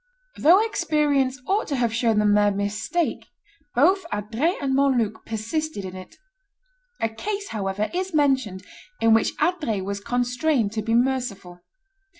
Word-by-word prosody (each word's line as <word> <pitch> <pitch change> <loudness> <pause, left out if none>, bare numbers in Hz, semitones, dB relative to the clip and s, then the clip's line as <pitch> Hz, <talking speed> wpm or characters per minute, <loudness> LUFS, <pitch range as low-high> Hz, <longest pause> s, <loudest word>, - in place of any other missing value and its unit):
Though 370 +8 +5
experience 295 -9 +1
ought 400 +7 0
to 285 - -1
have 235 -3 0
shown 225 -1 +1
them 210 -1 +3
their 205 0 +4
mistake, 205 - -2 0.5
both 365 +10 +4
Adrets 225 - -1
and 275 -2 -1
Montluc 255 -6 +1
persisted 225 +2 -3
in 185 0 -7
it. 185 0 -11 0.8
A - - +1
case, 400 - -5
however, 205 0 -2
is 370 +1 -2
mentioned 265 - +1 0.4
in 225 0 +4
which 225 - +2
Adrets 300 - 0
was 200 0 -3
constrained 245 +1 0
to 220 0 -2
be 225 +2 0
merciful. 235 -8 -1
245 Hz, 145 wpm, -24 LUFS, 210-300 Hz, 0.8 s, Though